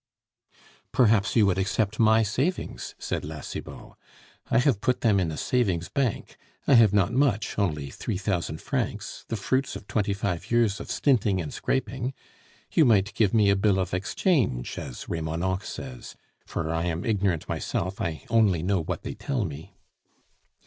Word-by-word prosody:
"Perhaps 110 -4 +3
you 110 -3 +6
would 95 -1 +2
accept 100 +2 0
my 110 0 +5
savings," 130 - -2
said - - -3
La 75 0 -6
Cibot. - - -8 0.6
"I - - +3
have 125 -5 +3
put 125 - +1
them 105 -4 +4
in 90 -3 0
a 75 - -5
savings 95 -9 0
bank. 135 -5 -2 0.3
I - - +4
have 115 -5 +7
not 105 +2 +2
much, 120 -6 +1
only 75 -8 -1
three 105 - -3
thousand 90 -5 -2
francs, - - -3
the - - -2
fruits 130 +6 -1
of - - -8
twenty 105 -1 0
five 95 -4 -3
years 115 -3 +2
of - - -8
stinting 110 -9 +2
and 80 -4 -4
scraping. 130 -1 -2 0.6
You 160 - +5
might 105 -5 +3
give 105 -4 +2
me 105 -3 +4
a - - +3
bill 100 0 +2
of 95 -1 -2
exchange, 95 - 0
as 60 - -7
Remonencq 85 +4 -2
says; 125 -4 -8 0.3
for 80 0 -2
I 80 +1 -1
am 85 0 -2
ignorant 100 -7 0
myself, 95 +3 -3
I 80 -2 -3
only 105 -8 +3
know 95 -1 +1
what 80 - -4
they - - -4
tell 110 +1 -2
me." 75 0 -8
100 Hz, 170 wpm, -26 LUFS, 90-115 Hz, 0.6 s, have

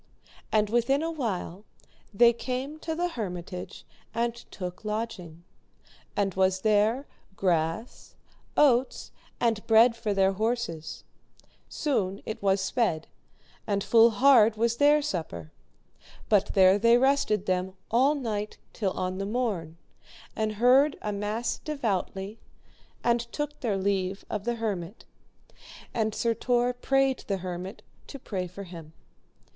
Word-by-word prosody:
And 215 -1 +2
within 240 +5 +2
a 330 - -1
while 205 - -4 0.5
they 235 +3 +5
came 260 +5 -4
to 320 0 -4
the 350 +2 -1
hermitage 180 - -6 0.3
and 235 0 0
took 185 -5 -8
lodging; 210 -6 -5 0.7
and 200 -2 0
was 190 0 +1
there 220 +5 +2 0.3
grass, 170 +4 -2 0.4
oats 260 -3 +3 0.3
and 225 -3 +1
bread 230 +1 +6
for 225 -2 -3
their 195 0 +3
horses; 220 -6 -3 0.7
soon 200 - -1
it 220 - -5
was 195 0 +2
sped, 195 -7 -1 0.6
and 200 -2 0
full 230 0 +6
hard 230 -2 +5
was 230 +1 +1
their 295 +2 +5
supper; 150 - -4 0.8
but 205 -2 +2
there 190 +1 +6
they 230 +2 +5
rested 255 -6 +2
them 185 0 -1 0.2
all 265 +6 +4
night 215 -6 -3 0.2
till 195 -4 -1
on 185 +1 -3
the 195 - -2
morn, 200 -9 -2 0.6
and 215 -1 -1
heard 255 +7 +4
a 210 - -2
mass 210 +4 -2
devoutly, 215 -7 -3 0.6
and 235 0 +3
took 295 0 -4
their 215 -6 -1
leave 195 0 -1
of 210 -1 -3
the 240 0 0
hermit, 205 -4 -4 0.9
and 220 -2 -1
Sir 230 -1 +1
Tor 245 +1 +1
prayed 270 +1 +1
the 195 - 0
hermit 185 +2 -6 0.2
to 275 - -8
pray 190 -8 -4
for 185 +3 -9
him. 165 -4 -11
215 Hz, 130 wpm, -27 LUFS, 190-240 Hz, 0.9 s, bread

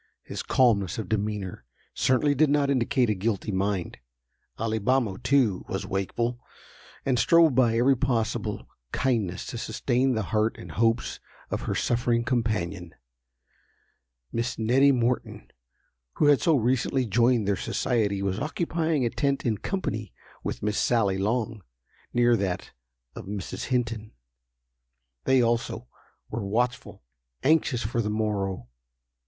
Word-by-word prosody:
His - - -5
calmness 105 -8 +2
of 110 -4 -4
demeanor 105 - -2 0.3
certainly 130 +3 +2
did 150 +2 +3
not 140 -1 +2
indicate 130 -2 +2
a - - +2
guilty 105 +1 -2
mind. 95 -4 -2 0.6
Alibamo, 110 -1 0
too, 125 -7 +2
was 95 0 -3
wakeful, 115 +6 -2 0.7
and 130 -3 +2
strove 165 -3 +5
by 120 -3 +3
every 130 +3 +4
possible 120 -4 -1 0.3
kindness 110 -9 -1
to 120 - -5
sustain 125 +3 0
the 110 - 0
heart 110 +1 +1
and - - -9
hopes 115 +1 0 0.3
of - - -2
her - - 0
suffering 120 -1 +1
companion. 105 -8 -2 1.4
Miss 120 +2 -2
Nettie 130 +5 +4
Morton, 125 -1 -1 0.6
who - - +1
had 145 -2 +5
so 165 - +4
recently 130 +1 +1
joined 120 0 +2
their 100 - +2
society, 100 0 0
was 95 0 -1
occupying 160 -1 -1
a 115 - 0
tent 140 -1 -1
in 110 -4 0
company 110 - -3 0.3
with - - -4
Miss 105 0 0
Sally 105 -6 +2
Long, 110 +1 -1 0.5
near 120 0 +4
that 95 -3 -3 0.4
of - - -8
Mrs. 100 -1 -5
Hinton. 115 -4 -2 1.1
They 130 -2 +4
also, 120 0 -1 0.4
were 115 0 -3
watchful—anxious 110 - -1
for 115 +2 -1
the 105 - -2
morrow. 100 - -2
115 Hz, 130 wpm, -26 LUFS, 105-130 Hz, 1.4 s, strove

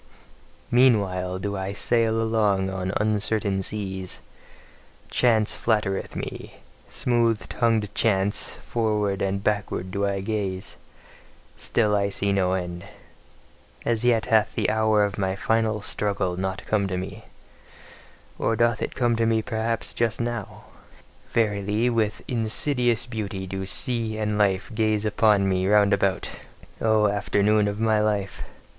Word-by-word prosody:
Meanwhile 100 -7 +3
do 100 +2 -3
I 95 0 -3
sail 115 +1 +1
along 105 -4 +1
on 95 -1 -3
uncertain 105 -1 0
seas; 95 -2 -4 0.9
chance 110 -3 +2
flattereth 105 -4 -1
me, - - -6 0.3
smooth 115 -4 0
tongued 110 -4 0
chance; 100 -2 +1
forward 105 -4 -1
and 100 0 -1
backward 100 -3 -1
do 100 +1 0
I 100 -1 -2
gaze, 95 -3 -3 0.8
still 105 -3 +1
see 100 0 -2
I - - +3
no 95 -2 +1
end. 90 -2 -4 1.0
As 115 -1 0
yet 115 -2 +3
hath 110 -3 +2
the - - +1
hour 110 -1 +3
of 100 -1 -5
my 95 -1 0
final 110 0 0
struggle 100 -4 -1
not 95 +1 -4
come 100 -2 +1
to 95 -1 -3
me 100 +4 -7 1.1
or 115 - +1
doth 115 -1 +1
it - - -3
come 120 -2 +1
to 115 0 +2
me 110 -1 +1
perhaps 115 -1 -2
just 115 -2 -1
now? 120 -3 -4 0.7
Verily, 105 +1 +1
with 110 -3 -1
insidious 120 +1 +2
beauty 105 -5 -4
do 95 0 -5
sea 115 0 +1
and 105 -1 -1
life 100 +1 +1
gaze 110 -1 +1
upon 105 -2 +3
me 95 0 +1
round 105 0 +4
about: 95 -3 +1 0.5
O 110 -1 +3
afternoon 105 +1 +2
of 100 +1 -3
my 110 -1 +2
life! 105 -3 -1
105 Hz, 135 wpm, -24 LUFS, 95-110 Hz, 1.1 s, round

